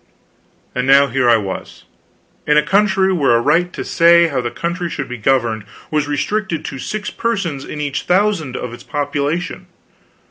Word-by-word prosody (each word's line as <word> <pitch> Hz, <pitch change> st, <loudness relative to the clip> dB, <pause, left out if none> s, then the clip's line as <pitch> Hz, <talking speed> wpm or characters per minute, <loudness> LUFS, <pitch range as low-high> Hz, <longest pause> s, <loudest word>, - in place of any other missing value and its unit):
And 125 Hz, +1 st, -2 dB
now 140 Hz, +1 st, +7 dB
here 125 Hz, 0 st, +2 dB
I 115 Hz, -, +6 dB
was, 100 Hz, -3 st, -6 dB, 0.6 s
in 150 Hz, 0 st, +4 dB
a 150 Hz, -, +5 dB
country 195 Hz, -1 st, +2 dB
where 140 Hz, -9 st, +3 dB
a -, -, +4 dB
right 165 Hz, +8 st, +2 dB
to -, -, -5 dB
say 170 Hz, 0 st, +5 dB
how 135 Hz, -4 st, -1 dB
the 120 Hz, -, -2 dB
country 170 Hz, +5 st, -3 dB
should 135 Hz, -4 st, -4 dB
be 125 Hz, -1 st, -7 dB
governed 115 Hz, -2 st, +1 dB, 0.3 s
was 150 Hz, -1 st, 0 dB
restricted 165 Hz, +4 st, -2 dB
to 135 Hz, -, -6 dB
six 210 Hz, +8 st, -4 dB
persons 195 Hz, -, -2 dB
in 150 Hz, -, -7 dB
each 145 Hz, -2 st, -3 dB
thousand 180 Hz, -8 st, +1 dB
of 125 Hz, -1 st, -5 dB
its 120 Hz, -, -10 dB
population. 145 Hz, +3 st, -3 dB
150 Hz, 175 wpm, -18 LUFS, 130-175 Hz, 0.6 s, now